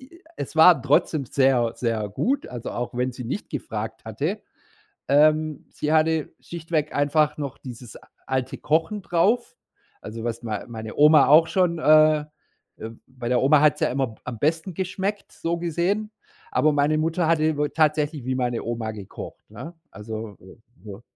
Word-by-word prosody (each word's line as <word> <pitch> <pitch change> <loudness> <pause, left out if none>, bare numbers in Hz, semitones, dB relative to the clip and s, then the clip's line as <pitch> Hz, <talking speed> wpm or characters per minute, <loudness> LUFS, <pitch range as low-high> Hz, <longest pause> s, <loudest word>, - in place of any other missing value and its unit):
i 350 - -21
es - - -6
war 160 -3 +7
trotzdem 145 +1 +1
sehr, 130 -3 +2
sehr 110 -4 -2
gut, 265 - -1
also, 120 -2 -7
auch 120 0 -4
wenn 125 +1 -1
sie 125 0 -8
nicht 140 - -5
gefragt 110 -6 -6
hatte. 150 - -3 0.7
Ähm, 155 +1 +3
sie 150 - -3
hatte 160 -1 +1
schlichtweg 160 -3 -3
einfach 150 +2 +2
noch 140 -3 -5
dieses 120 -2 -10 0.3
alte 130 -1 -2
Kochen 160 +7 0
drauf, 180 +3 +1 0.5
also, 110 +1 -8
was 120 0 -3
mei 110 -2 -4
meine 110 -2 -8
Oma 150 0 +6
auch 160 +3 +6
schon, 175 -3 +1
äh 155 0 +5 0.5
äh, 110 - -7 0.2
bei 125 -2 -8
der 125 -1 +2
Oma 140 +2 +5
hat's 150 -2 +3
ja - - +2
immer 130 -4 -2
am 120 -3 -6
besten 160 - -1
geschmeckt, 190 +3 -4
so 170 +1 -3
gesehen, 175 +6 -1 0.4
aber 155 - +2
meine 145 +2 +2
Mutter 165 +2 0
hatte 155 -2 +2
über 150 -1 -1
tatsächlich 150 -3 +1
wie 130 0 -1
meine 120 -2 -2
Oma 115 -1 -3
gekocht, 100 -3 -10
ne? 130 +11 -9 0.2
Also, 110 -1 -7
äh, 95 +5 -15 0.3
so 105 +2 -9
145 Hz, 165 wpm, -24 LUFS, 120-160 Hz, 0.7 s, war